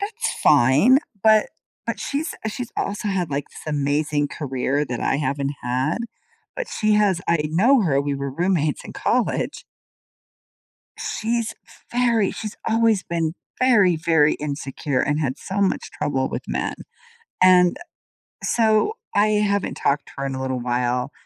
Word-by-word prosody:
that's 440 Hz, +4 st, -2 dB
fine. 150 Hz, -, +5 dB, 0.2 s
But 215 Hz, -1 st, +5 dB, 0.4 s
but -, -, -3 dB
she's 295 Hz, +4 st, -3 dB
she's 240 Hz, +2 st, -6 dB
also 205 Hz, +1 st, -2 dB
had, 185 Hz, -5 st, -1 dB
like, 140 Hz, 0 st, -2 dB
this 155 Hz, -, -8 dB
amazing 145 Hz, +1 st, 0 dB
career 140 Hz, 0 st, -1 dB
that 120 Hz, -2 st, -4 dB
I -, -, +1 dB
haven't 140 Hz, -1 st, -2 dB
had. 130 Hz, -, 0 dB, 0.6 s
But -, -, -4 dB
she 215 Hz, 0 st, 0 dB
has 205 Hz, -4 st, +3 dB
I 170 Hz, -2 st, +3 dB
know 230 Hz, -, +4 dB
her. 140 Hz, -7 st, +2 dB
We 140 Hz, 0 st, -2 dB
were 140 Hz, 0 st, -3 dB
roommates 170 Hz, -1 st, 0 dB
in -, -, -8 dB
college. -, -, -1 dB, 1.3 s
She's 230 Hz, 0 st, -2 dB, 0.4 s
very 235 Hz, -4 st, +2 dB
she's 215 Hz, -2 st, -6 dB
always 225 Hz, -3 st, +3 dB
been 165 Hz, -2 st, -2 dB, 0.3 s
very, 210 Hz, -9 st, +4 dB
very 160 Hz, -2 st, +3 dB
insecure 140 Hz, -1 st, -3 dB
and 150 Hz, +1 st, 0 dB
had 135 Hz, -4 st, -1 dB
so 190 Hz, +2 st, -4 dB
much 195 Hz, -, 0 dB
trouble 130 Hz, -2 st, -1 dB
with -, -, -5 dB
men, -, -, -2 dB, 0.7 s
and 180 Hz, -1 st, +6 dB, 0.7 s
so, 225 Hz, -, +2 dB, 0.2 s
I 205 Hz, +1 st, +4 dB
haven't 200 Hz, -1 st, 0 dB
talked 140 Hz, +1 st, 0 dB
to -, -, -13 dB
her 140 Hz, -, -3 dB
in 135 Hz, -, -4 dB
a 130 Hz, -, -4 dB
little 130 Hz, -1 st, -2 dB
while, 125 Hz, +2 st, -1 dB
165 Hz, 150 wpm, -22 LUFS, 140-215 Hz, 1.3 s, and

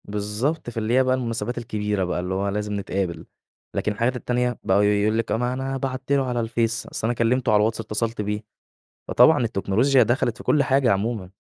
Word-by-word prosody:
بالضبط. 105 Hz, +9 st, -2 dB
فاللي 115 Hz, 0 st, -2 dB
هي 130 Hz, +1 st, +5 dB
بقى 130 Hz, 0 st, +2 dB
المناسبات 120 Hz, -1 st, -3 dB
الكبيرة 105 Hz, -4 st, -2 dB
بقى، 90 Hz, -1 st, -2 dB
اللي 90 Hz, +1 st, -3 dB
هو 100 Hz, +1 st, -1 dB
لازم 105 Hz, +1 st, -3 dB
نتقابل. 95 Hz, -3 st, -3 dB, 0.5 s
لكن 105 Hz, -, 0 dB
الحاجات 120 Hz, +4 st, 0 dB
التانية، 125 Hz, 0 st, -1 dB
بقوا 100 Hz, +2 st, +3 dB
يقول 105 Hz, +1 st, +2 dB
لِك: 115 Hz, 0 st, -2 dB
"أ -, -, +2 dB
ما 125 Hz, +1 st, -1 dB
أنا 135 Hz, +1 st, -3 dB
بعت 130 Hz, 0 st, -4 dB
له 140 Hz, -1 st, +3 dB
على 125 Hz, -1 st, -1 dB
الفيس، 115 Hz, 0 st, -1 dB
أصل 110 Hz, -, -3 dB
أنا 120 Hz, -, +1 dB
كلّمته 120 Hz, +1 st, +1 dB
على 105 Hz, -, +5 dB
الواتس 110 Hz, +2 st, +1 dB
اتّصلت 110 Hz, +1 st, -2 dB
بيه." 105 Hz, +1 st, -3 dB, 0.6 s
فطبعًا 160 Hz, -2 st, +5 dB
التكنولوجيا 115 Hz, +5 st, +2 dB
دخَلِت 120 Hz, 0 st, 0 dB
في -, -, -10 dB
كل 150 Hz, -, +3 dB
حاجة 135 Hz, -2 st, +3 dB
عمومًا 100 Hz, -1 st, -1 dB
115 Hz, 200 wpm, -23 LUFS, 105-125 Hz, 0.6 s, هي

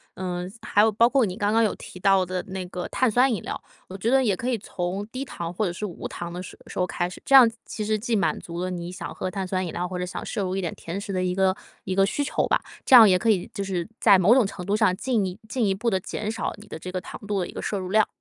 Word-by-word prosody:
嗯， 180 Hz, 0 st, -4 dB
还 205 Hz, -, +3 dB
有 220 Hz, +1 st, +5 dB
包 230 Hz, +3 st, +5 dB
括 260 Hz, -1 st, +3 dB
你 185 Hz, -1 st, -5 dB
刚 205 Hz, -1 st, +1 dB
刚 225 Hz, +1 st, +4 dB
有 215 Hz, -, +2 dB
提 -, -, -11 dB
到 195 Hz, 0 st, +4 dB
的 180 Hz, 0 st, -3 dB
那 190 Hz, -1 st, -5 dB
个 180 Hz, 0 st, -5 dB
碳 255 Hz, -, +2 dB
酸 250 Hz, +3 st, +3 dB
饮 205 Hz, -, -2 dB
料。 -, -, -5 dB, 0.3 s
我 190 Hz, -, -8 dB
觉 215 Hz, +4 st, -1 dB
得 270 Hz, 0 st, +5 dB
也 210 Hz, -6 st, +2 dB
可 240 Hz, +7 st, -3 dB
以 245 Hz, -, +1 dB
从 190 Hz, 0 st, -4 dB
低 255 Hz, +4 st, -5 dB
糖， 170 Hz, -11 st, -5 dB
或 210 Hz, +4 st, 0 dB
者 180 Hz, -, -1 dB
是 185 Hz, +4 st, -5 dB
无 180 Hz, -, -7 dB
糖 175 Hz, 0 st, -6 dB
的 180 Hz, -, -5 dB
时 -, -, -10 dB
时 -, -, -9 dB
候 180 Hz, -, +3 dB
开 175 Hz, 0 st, -2 dB
始， -, -, -11 dB
这 -, -, 0 dB
样 250 Hz, -4 st, +9 dB, 0.2 s
其 215 Hz, -, -5 dB
实 215 Hz, 0 st, +1 dB
既 230 Hz, +2 st, -1 dB
满 190 Hz, -, +1 dB
足 170 Hz, 0 st, -6 dB
了 185 Hz, -, -2 dB
你 175 Hz, -1 st, -5 dB
想 185 Hz, -, -6 dB
喝 185 Hz, -, -3 dB
碳 195 Hz, -1 st, -3 dB
酸 185 Hz, 0 st, -1 dB
饮 170 Hz, -, -4 dB
料， 180 Hz, -, -2 dB
或 180 Hz, 0 st, -5 dB
者 180 Hz, -, -2 dB
想 180 Hz, -, -6 dB
摄 210 Hz, -, -2 dB
入 185 Hz, 0 st, -2 dB
一 -, -, -1 dB
点 175 Hz, -, -3 dB
甜 170 Hz, +4 st, -5 dB
食 200 Hz, -1 st, -5 dB
的 185 Hz, -1 st, 0 dB
一 180 Hz, 0 st, 0 dB
个 190 Hz, 0 st, +2 dB, 0.3 s
一 185 Hz, -, -2 dB
个 195 Hz, 0 st, +5 dB
需 215 Hz, -, -2 dB
求 285 Hz, -, 0 dB
吧， -, -, +2 dB, 0.2 s
这 -, -, +2 dB
样 225 Hz, -4 st, +10 dB
也 185 Hz, -, +5 dB
可 225 Hz, +5 st, 0 dB
以 190 Hz, -5 st, +2 dB
就 200 Hz, -2 st, -3 dB
是 185 Hz, -3 st, -2 dB
在 200 Hz, -4 st, +6 dB
某 190 Hz, +5 st, +6 dB
种 260 Hz, -4 st, +5 dB
程 180 Hz, -2 st, -6 dB
度 200 Hz, -, +1 dB
上， 210 Hz, -4 st, +3 dB
进 230 Hz, -3 st, 0 dB
一 185 Hz, +2 st, -5 dB
进 240 Hz, 0 st, 0 dB
一 195 Hz, -, +2 dB
步 230 Hz, +4 st, 0 dB
地 190 Hz, -4 st, +1 dB
减 210 Hz, +3 st, -4 dB
少 225 Hz, -, -3 dB
你 210 Hz, -, -14 dB
的 -, -, -7 dB
这 180 Hz, +3 st, -7 dB
个 185 Hz, -, -2 dB
糖 -, -, -9 dB
度 205 Hz, -1 st, 0 dB
的 180 Hz, -, -1 dB
一 -, -, -9 dB
个 -, -, -5 dB
摄 205 Hz, -, -2 dB
入 185 Hz, -1 st, -5 dB
量。 215 Hz, +2 st, +4 dB
195 Hz, 340 characters per minute, -25 LUFS, 180-220 Hz, 0.3 s, 样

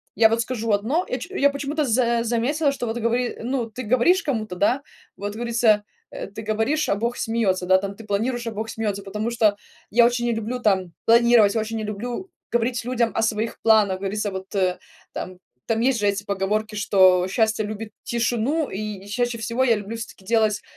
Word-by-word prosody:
я, 220 Hz, +2 st, +6 dB
вот, 225 Hz, +1 st, +1 dB
скажу 230 Hz, -1 st, -2 dB
одно, 230 Hz, -, +1 dB
я 255 Hz, -, -2 dB
че 285 Hz, -1 st, +1 dB
почему-то 285 Hz, +2 st, -2 dB
за 235 Hz, -1 st, +2 dB
заметила, 260 Hz, +6 st, +1 dB
что, 270 Hz, -3 st, -4 dB
вот, 225 Hz, -, -2 dB
гово 230 Hz, +1 st, +1 dB, 0.3 s
ну, 240 Hz, 0 st, -2 dB
ты 250 Hz, +4 st, -7 dB
говоришь 255 Hz, -, +3 dB
кому-то, 220 Hz, -, -2 dB
да. 225 Hz, +9 st, +2 dB, 0.3 s
Вот 205 Hz, +1 st, -5 dB
говорится, 230 Hz, -2 st, +2 dB, 0.3 s
э: -, -, -6 dB
ты 200 Hz, +3 st, -8 dB
говоришь, 225 Hz, +8 st, 0 dB
а -, -, +3 dB
Бог 235 Hz, +4 st, -2 dB
смеется, 220 Hz, -6 st, 0 dB
да, 185 Hz, +1 st, +5 dB
там, 200 Hz, +1 st, -4 dB
ты 225 Hz, -, -11 dB
планируешь, 230 Hz, +4 st, -1 dB
а -, -, -2 dB
Бог 220 Hz, +1 st, -4 dB
смеется. 210 Hz, -3 st, -3 dB
Потому 210 Hz, +3 st, -3 dB
что 220 Hz, -3 st, +3 dB, 0.4 s
я 235 Hz, +3 st, +6 dB
очень 240 Hz, 0 st, +1 dB
не 240 Hz, -, +1 dB
люблю, 225 Hz, +3 st, -3 dB
там, 190 Hz, -6 st, +1 dB
планировать, 235 Hz, -2 st, +5 dB
очень 225 Hz, 0 st, -1 dB
не 220 Hz, -, -3 dB
люблю 240 Hz, -, -5 dB, 0.2 s
говорить 240 Hz, 0 st, 0 dB
людям 240 Hz, -2 st, +1 dB
о -, -, +1 dB
своих 220 Hz, 0 st, -1 dB
планах. 215 Hz, -4 st, +4 dB
Говорится, 205 Hz, +1 st, -2 dB
вот, 190 Hz, 0 st, -6 dB, 0.7 s
там. 185 Hz, -1 st, -6 dB, 0.3 s
Там 225 Hz, -1 st, 0 dB
есть 250 Hz, +1 st, +2 dB
же 205 Hz, -2 st, +1 dB
эти 200 Hz, 0 st, 0 dB
поговорки, 210 Hz, +2 st, -1 dB
что 185 Hz, -3 st, +4 dB
"Счастье 220 Hz, +1 st, +1 dB
любит 215 Hz, +1 st, -6 dB
тишину" 240 Hz, +6 st, 0 dB
И 205 Hz, -1 st, -5 dB
чаще 240 Hz, +3 st, -1 dB
всего 230 Hz, +3 st, -1 dB
я 240 Hz, -3 st, +4 dB
люблю, 210 Hz, +2 st, -6 dB
всё-таки, 220 Hz, -4 st, -9 dB
делать 215 Hz, -1 st, +2 dB
225 Hz, 195 wpm, -23 LUFS, 210-240 Hz, 0.7 s, я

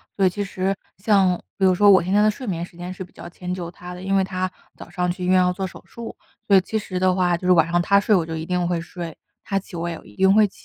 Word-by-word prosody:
所 195 Hz, -, +2 dB
以 -, -, +5 dB
其 205 Hz, +3 st, -3 dB
实 195 Hz, 0 st, -2 dB, 0.2 s
像 190 Hz, -2 st, +3 dB, 0.2 s
比 195 Hz, -, +2 dB
如 185 Hz, -1 st, +4 dB
说 205 Hz, +2 st, +5 dB
我 190 Hz, -, +6 dB
现 180 Hz, -, -3 dB
在 205 Hz, -, +5 dB
的 215 Hz, -, +5 dB
睡 255 Hz, +5 st, -9 dB
眠 170 Hz, -3 st, -2 dB
时 175 Hz, -, -19 dB
间 175 Hz, +1 st, -6 dB
是 185 Hz, -, -7 dB
比 185 Hz, -, -17 dB
较 -, -, -10 dB
迁 180 Hz, +1 st, -6 dB
就 175 Hz, -2 st, -5 dB
他 180 Hz, +1 st, -10 dB
的， 180 Hz, -, -9 dB
因 195 Hz, +1 st, 0 dB
为 195 Hz, -, +4 dB
他 185 Hz, -1 st, -2 dB, 0.2 s
早 -, -, -11 dB
上 180 Hz, -1 st, -1 dB
去 180 Hz, +1 st, -6 dB
医 -, -, -1 dB
院 185 Hz, 0 st, +5 dB
要 180 Hz, 0 st, +3 dB
做 190 Hz, +1 st, -3 dB
手 175 Hz, -, -12 dB
术， 235 Hz, -1 st, -9 dB, 0.3 s
所 200 Hz, -, +6 dB
以 -, -, +5 dB
其 220 Hz, +4 st, -3 dB
实 185 Hz, -3 st, -4 dB
的 185 Hz, 0 st, +3 dB
话 180 Hz, -2 st, +2 dB
就 180 Hz, -, -5 dB
是 -, -, +5 dB
晚 165 Hz, -3 st, +5 dB
上 175 Hz, -, +3 dB
他 200 Hz, +3 st, +4 dB
睡 210 Hz, +1 st, +3 dB
我 170 Hz, -4 st, +2 dB
就 165 Hz, 0 st, -5 dB
一 160 Hz, 0 st, -4 dB
定 180 Hz, 0 st, 0 dB
会 175 Hz, -1 st, -1 dB
睡， 170 Hz, -1 st, -7 dB, 0.3 s
他 195 Hz, -1 st, -1 dB
起 190 Hz, -, -12 dB
我 170 Hz, 0 st, -3 dB
也 170 Hz, -1 st, -4 dB
一 -, -, -17 dB
定 190 Hz, 0 st, +4 dB
会 215 Hz, 0 st, +5 dB
起。 -, -, -19 dB
185 Hz, 345 characters per minute, -22 LUFS, 175-195 Hz, 0.3 s, 我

